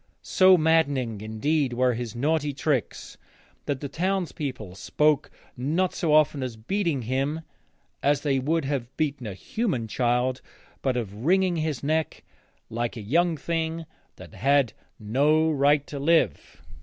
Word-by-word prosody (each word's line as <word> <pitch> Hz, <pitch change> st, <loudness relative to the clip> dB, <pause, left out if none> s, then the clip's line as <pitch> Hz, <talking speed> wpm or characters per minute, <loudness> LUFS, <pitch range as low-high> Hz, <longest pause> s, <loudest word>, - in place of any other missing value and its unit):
So 185 Hz, 0 st, +5 dB
maddening 145 Hz, -9 st, +1 dB
indeed 130 Hz, +6 st, 0 dB
were 125 Hz, +1 st, +2 dB
his 120 Hz, -1 st, -5 dB
naughty 150 Hz, +3 st, 0 dB
tricks 135 Hz, -4 st, -2 dB, 0.5 s
that 140 Hz, -2 st, -2 dB
the 145 Hz, -, -3 dB
townspeople 150 Hz, -, -3 dB
spoke 150 Hz, +9 st, +1 dB, 0.3 s
not 160 Hz, +9 st, 0 dB
so 165 Hz, -, -1 dB
often 150 Hz, -2 st, +3 dB
of 115 Hz, -4 st, -6 dB
beating 170 Hz, -7 st, 0 dB
him, 135 Hz, +6 st, -1 dB, 0.6 s
as 145 Hz, 0 st, +2 dB
they 140 Hz, -3 st, +1 dB
would 155 Hz, +3 st, 0 dB
have 135 Hz, -4 st, -2 dB
beaten 145 Hz, -6 st, -2 dB
a 100 Hz, -, -6 dB
human 175 Hz, -, -2 dB
child, 125 Hz, +2 st, 0 dB, 0.4 s
but 130 Hz, -2 st, 0 dB
of 105 Hz, -1 st, -5 dB
wringing 185 Hz, +2 st, +2 dB
his 155 Hz, -4 st, -2 dB
neck 155 Hz, +2 st, -1 dB, 0.4 s
like 120 Hz, +1 st, -3 dB
a -, -, -5 dB
young 165 Hz, -, +1 dB
thing 165 Hz, +1 st, -2 dB, 0.3 s
that -, -, -13 dB
had 135 Hz, -3 st, +2 dB, 0.3 s
no 150 Hz, +9 st, +2 dB
right 145 Hz, 0 st, +3 dB
to 145 Hz, -, -7 dB
live. 140 Hz, -, +1 dB
140 Hz, 145 wpm, -25 LUFS, 125-160 Hz, 0.6 s, So